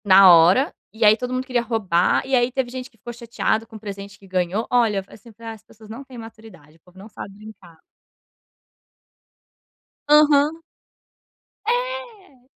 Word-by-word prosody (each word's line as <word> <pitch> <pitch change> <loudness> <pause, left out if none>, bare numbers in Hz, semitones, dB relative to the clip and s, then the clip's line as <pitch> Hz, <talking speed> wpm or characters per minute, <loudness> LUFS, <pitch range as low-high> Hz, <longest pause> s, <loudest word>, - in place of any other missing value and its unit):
Na 190 -1 +8
hora, 175 - +4 0.2
e 220 0 0
aí, 210 +1 +7
todo 250 +2 -6
mundo 255 0 -3
queria 250 -2 -1
roubar, 210 -5 0
e 265 0 0
aí, 245 0 +1
teve 260 -1 -2
gente 255 0 -7
que 225 - -31
ficou 240 +3 -9
chateada 230 -1 -2
com 225 - -15
o - - -9
presente 200 -1 -9
que 195 - -18
ganhou. 185 +3 -2
Olha, 225 -5 +1
falei, - - -17
assim: 230 - -17
"Ah, 230 -1 -8
as 220 -1 -16
pessoas 220 -1 -18
não 230 +5 -9
têm 265 -2 -14
maturidade, 220 -9 -14
o - - -37
povo 180 +1 -22
não 195 +3 -12
sabe 200 -2 -10
brincar." 200 -6 -15 2.3
Aham. 300 +1 +4 1.1
É. 485 - -4
225 Hz, 170 wpm, -21 LUFS, 200-255 Hz, 2.3 s, Na